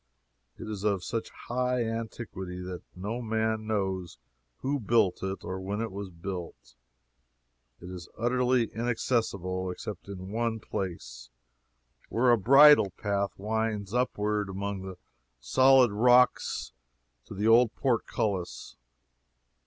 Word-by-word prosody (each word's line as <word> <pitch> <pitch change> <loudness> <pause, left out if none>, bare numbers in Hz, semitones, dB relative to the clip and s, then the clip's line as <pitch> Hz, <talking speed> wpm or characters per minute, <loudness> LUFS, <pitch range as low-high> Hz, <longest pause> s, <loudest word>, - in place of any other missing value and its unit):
It - - -8
is 105 -2 -5
of 100 -4 +1
such 115 -2 -3
high 125 0 -2
antiquity 110 -5 -5
that 90 -1 -6
no 105 +7 -4
man 110 -1 -1
knows 95 -4 -2 0.4
who 140 +2 -1
built 110 -4 +2
it 95 0 -4
or 95 0 -4
when 100 +2 -3
it 115 -2 -3
was 100 0 -6
built. 85 -8 -7 1.1
It 90 - -10
is 90 -3 -9
utterly 125 +1 +2
inaccessible, 110 -6 -1
except 100 +1 -7
in 95 -1 -8
one 115 0 -1
place, 70 - -6 0.8
where 120 +2 +3
a 120 - +5
bridle 140 +1 +7
path 100 -1 -1
winds 110 -1 -2
upward 105 -4 0
among 100 0 -4
the 95 -1 -8 0.4
solid 130 - +5
rocks 125 +4 +3 0.5
to - - -9
the 105 +3 0
old 115 0 +5
portcullis. 110 -7 -2
105 Hz, 120 wpm, -28 LUFS, 95-115 Hz, 1.1 s, bridle